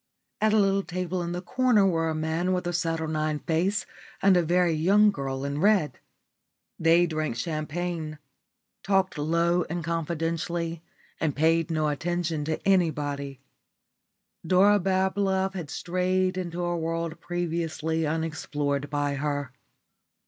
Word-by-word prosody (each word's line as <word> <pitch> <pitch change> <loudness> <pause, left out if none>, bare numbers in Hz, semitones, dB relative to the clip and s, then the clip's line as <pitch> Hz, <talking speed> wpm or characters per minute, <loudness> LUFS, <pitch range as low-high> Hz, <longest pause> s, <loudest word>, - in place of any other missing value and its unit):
At 215 0 +4
a 220 - +4
little 195 -1 +3
table 180 0 -3
in 170 0 -3
the 180 +1 -4
corner 250 -2 +3
were 165 -3 +1
a 160 - -2
man 160 +4 0
with 180 -1 -1
a 175 - -2
saturnine 160 -2 -1
face 175 +7 0 0.3
and 195 -1 +5
a 175 - +5
very 175 +1 +2
young 200 +7 +4
girl 135 -4 -4
in 140 +1 -2
red. 190 - +2 0.8
They 165 +2 +5
drank 155 -6 -2
champagne, 155 +3 -3 0.6
talked 195 -1 +1
low 170 +3 +2
and 175 +1 -3
confidentially, 165 0 -2 0.4
and 155 -3 0
paid 165 +2 +2
no 155 -2 0
attention 160 0 -1
to 155 +4 -3
anybody. 145 -7 0 1.0
Dora 195 +4 +5
Bablove 190 0 +1
had 175 -6 -6
strayed 185 +2 0
into 175 -1 -3
a 175 0 0
world 165 0 -3
previously 165 -1 -2
unexplored 145 -3 -2
by 145 -1 -1
her. 145 -2 -2
165 Hz, 135 wpm, -27 LUFS, 155-180 Hz, 1.0 s, and